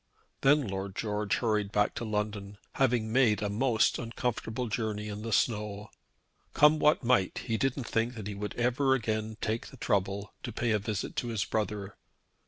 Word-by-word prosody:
Then 145 -2 +4
Lord 95 0 -4
George 105 -2 -1
hurried 105 -4 0
back 105 -1 +2
to - - -4
London, 105 -2 -3 0.2
having 120 -4 +1
had 115 -6 +4
a 105 - 0
most 115 +1 +2
uncomfortable 120 0 -3
journey 105 -1 -2
in 105 0 -5
the 115 +1 -4
snow. 105 -2 0 0.6
Come 150 +1 +6
what 150 -1 +4
might 120 -6 +2
he 115 - 0
didn't 135 +3 0
think 115 +2 0
that 110 -3 -6
he 105 - -4
would 105 +1 -5
ever 125 +3 +2
again 110 -2 -2
take 110 +1 -2
the 135 - -13
trouble 100 -2 -1
to 120 - -5
pay 115 +1 -1
a 105 - +3
visit 105 -2 -3
to 120 - -1
his 110 -4 -1
brother. 105 -2 -3
110 Hz, 180 wpm, -30 LUFS, 105-120 Hz, 0.6 s, Come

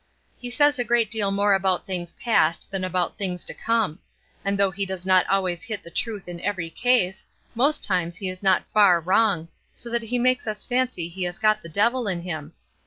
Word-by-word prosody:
He 245 - -6
says 290 +2 +3
a - - +2
great 235 -3 +1
deal 215 -3 0
more 200 +1 +2
about 190 -2 +1
things 175 -3 -5
past 170 -8 +1
than 195 -1 -2
about 180 -1 -2
things 180 -3 -2
to - - -1
come; 225 -8 -1 0.4
and 200 0 0
though 200 -1 +3
he 195 +2 -3
does 190 -2 -4
not 185 -1 +4
always 185 -3 0
hit 220 -3 -4
the 170 - -12
truth 210 -3 -3
in 175 -1 -7
every 185 -5 -3
case, 210 -4 +1 0.3
most 280 +6 +2
times 175 -3 0
he 190 +2 -4
is 185 0 -4
not 190 -2 +3
far 200 -5 +6
wrong, 185 -1 +2 0.3
so 235 - -4
that 235 0 0
he 230 +2 -2
makes 255 0 +1
us 215 -1 -3
fancy 250 -9 0
he 180 +2 -9
has 175 +1 -4
got 215 0 +2
the 170 - -10
devil 235 +7 +1
in 175 -3 -2
him. 160 -5 -6
195 Hz, 215 wpm, -24 LUFS, 180-230 Hz, 0.4 s, far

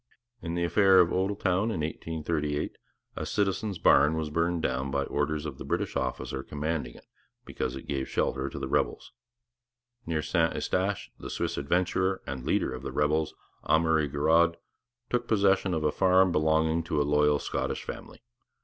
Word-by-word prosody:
In 85 -1 -4
the 85 - 0
affair 95 +2 +5
of 85 -2 +5
Odelltown 95 0 0
in 85 - -2
1838 75 -1 -3 0.4
a - - -4
citizen's 100 0 -1
barn 75 -2 +5
was 80 -1 -3
burnt 85 +1 0
down 65 +1 -1
by 70 +1 0
orders 75 +2 -2
of 75 - -6
the - - -5
British - - -2
officer 65 - -2
commanding 75 -3 -4 0.5
because - - -3
it 65 - -8
gave 70 -2 -2
shelter 65 0 -1
to 70 - -8
the 70 -1 -3
rebels. - - -1 1.0
Near 80 -2 -1
St - - +1
Eustache 95 +2 -1
the - - -7
Swiss 85 0 -2
adventurer 90 +5 0
and 65 -2 -5
leader - - +1
of 65 - -6
the - - -5
rebels, 75 +1 0 0.3
Amury 80 -2 +2
Girod, 85 +4 +3 0.6
took 120 -1 0
possession 100 -3 +3
of 80 - -1
a 75 - +2
farm 95 +1 +4
belonging 80 +1 +2
to 80 - -1
a - - +3
loyal 75 0 +3
Scottish - - -3
family. - - -9
80 Hz, 165 wpm, -28 LUFS, 75-90 Hz, 1.0 s, affair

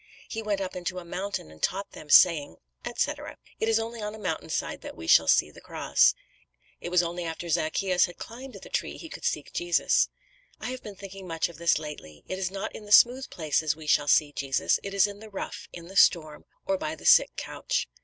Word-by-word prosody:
"He 225 - -4
went 205 -2 -1
up 190 -1 -4
into 180 0 -4
a 180 - -6
mountain 185 - -4
and 80 - -16
taught 195 +1 -1
them, 150 - -12
saying," 150 - +6 0.3
etc. - - -3 0.2
"It 220 - +1
is 225 - +4
only 225 0 -4
on 210 +1 -4
a - - -9
mountain 210 -4 -3
side - - -3
that - - -9
we 80 - -8
shall 80 0 +6
see - - +4
the - - -15
cross. - - +3 0.6
It - - -5
was 180 0 +4
only 175 +1 -3
after 165 +1 -5
Zacchæus 180 +3 +1
had 175 - -12
climbed 255 +3 -9
the - - -11
tree - - -2
he 330 - -9
could - - -8
see 150 - 0
Jesus. 175 -1 +2 0.5
I 245 - -4
have 255 0 -6
been 210 -2 -9
thinking 195 -1 -10
much 165 0 -1
of 170 - -13
this 170 -2 +3
lately. 150 - -9
It 185 - -4
is 185 -2 -1
not 195 +2 -5
in 210 - -9
the 205 - -11
smooth 250 +5 +6
places 155 -2 0
we 160 0 -11
shall 145 -1 +3
see 145 0 +4
Jesus, 135 -2 0
it 200 0 -6
is 200 - +5
in 205 0 -6
the 220 0 -11
rough, 195 - -6
in 170 -1 -10
the 190 - -12
storm, 155 -5 +3 0.2
or 290 -1 0
by 315 0 -3
the - - -14
sick - - +6
couch." - - -2
185 Hz, 230 wpm, -27 LUFS, 160-210 Hz, 0.6 s, saying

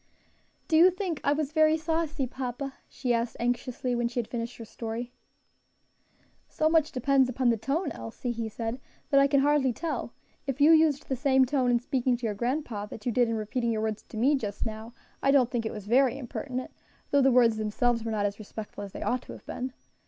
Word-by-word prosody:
"Do 320 - +3
you 350 +3 +8
think 365 -4 -3
I 285 - +3
was 295 -1 0
very 310 0 +4
saucy, 320 -3 -1
papa?" 260 +1 -5 0.2
she 250 -3 -1
asked 235 0 -1
anxiously, 245 +1 -1
when 240 0 +1
she 240 +1 -3
had 230 - -2
finished 235 0 -5
her 230 - -8
story. 230 +2 -5 1.4
"So 310 - +1
much 320 -2 +3
depends 265 0 +3
upon 255 0 +1
the 230 - +4
tone, 285 - -1
Elsie," 115 - -5
he 230 -1 -3
said, 225 +3 -4 0.3
"that 275 - +6
I 275 - +5
can 280 -1 +3
hardly 285 -2 +3
tell; 285 -3 -4 0.3
if 270 0 -2
you 295 +3 +7
used 315 -3 +4
the 265 - -1
same 265 0 +4
tone 260 -1 +1
in 240 -1 +3
speaking 250 0 0
to 240 - -5
your 215 - 0
grandpa 240 -2 -2
that 210 0 -10
you 245 - +1
did 240 0 +2
in 230 - 0
repeating 230 +2 -1
your 220 -1 -1
words 220 -1 -2
to 220 - -8
me 260 +7 +4
just 210 -8 -2
now, 220 +1 -6 0.3
I 275 - +2
don't 265 -3 +4
think 230 -3 -1
it - - -4
was 210 -2 -7
very 255 +3 +3
impertinent; 255 0 -5 0.4
though 285 - +5
the 270 0 +5
words 235 -3 +5
themselves 225 +2 0
were 225 - -3
not 210 -2 0
as 205 +1 -2
respectful 210 -1 -7
as 200 - -8
they - - -5
ought 250 0 0
to - - -10
have - - -13
been. 255 +1 -4
250 Hz, 220 wpm, -28 LUFS, 230-275 Hz, 1.4 s, you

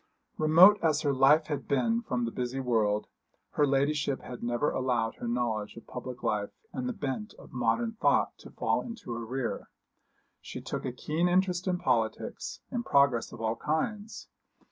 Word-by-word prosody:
Remote 170 +7 +7
as 155 -2 +2
her 145 -3 +1
life 135 +4 +5
had 145 -2 -4
been 230 +11 +1
from 125 - -2
the 115 - -3
busy 125 +2 -3
world, 110 -5 +1 0.5
her 145 - +2
ladyship 140 0 +1
had 125 -1 -8
never 120 +4 0
allowed 120 -3 0
her 120 - -5
knowledge 115 -3 -1
of 115 - -11
public 125 0 -7
life 105 -1 0 0.2
and 255 0 -3
the - - -2
bent 205 - -4
of - - -15
modern 125 - +1
thought 225 - +2
to - - -12
fall - - 0
into 230 - -7
arrear. 120 +2 -4 0.7
She - - -7
took - - -5
a 125 - -1
keen 155 +7 -1
interest 180 0 +1
in 180 -1 +1
politics, 115 -8 -1
in 245 - -1
progress 140 - +3
of 120 - -9
all 110 0 -1
kinds. 205 - -3
135 Hz, 170 wpm, -29 LUFS, 120-175 Hz, 0.7 s, Remote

